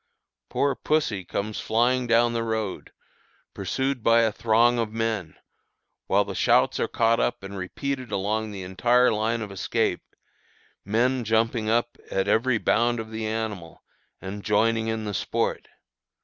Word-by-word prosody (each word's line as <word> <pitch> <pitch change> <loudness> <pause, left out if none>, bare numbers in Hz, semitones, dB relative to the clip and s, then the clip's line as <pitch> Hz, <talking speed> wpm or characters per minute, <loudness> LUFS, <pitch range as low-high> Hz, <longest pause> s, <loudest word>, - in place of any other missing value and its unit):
Poor 140 0 +1
pussy 130 -9 0
comes 105 +4 -4
flying 120 +3 +1
down 120 0 +3
the 115 - -1
road, 110 -3 -3 0.6
pursued 130 +7 -2
by 115 +1 +5
a 110 - +2
throng, 115 +2 +3
of 115 -2 -1
men, 110 -7 -2 0.7
while 100 +1 +3
the 100 - -5
shouts - - +3
are - - +1
caught 115 0 +2
up 120 - -1
and 100 0 -7
repeated 130 +6 -4
along 105 +2 -1
the 100 -2 -7
entire 120 +7 +3
line 110 +1 0
of 105 - -8
escape, 95 - -1 0.8
men 120 +5 +1
jumping 110 0 +1
up 120 +1 0
at 95 0 -1
every 115 +3 +2
bound 120 +2 +1
of 110 0 -7
the 110 0 -3
animal, 110 -6 -5 0.4
and 100 +2 -7
joining 110 +2 +2
in 110 -1 -2
the 105 - -3
sport. - - -2
110 Hz, 150 wpm, -25 LUFS, 105-120 Hz, 0.8 s, by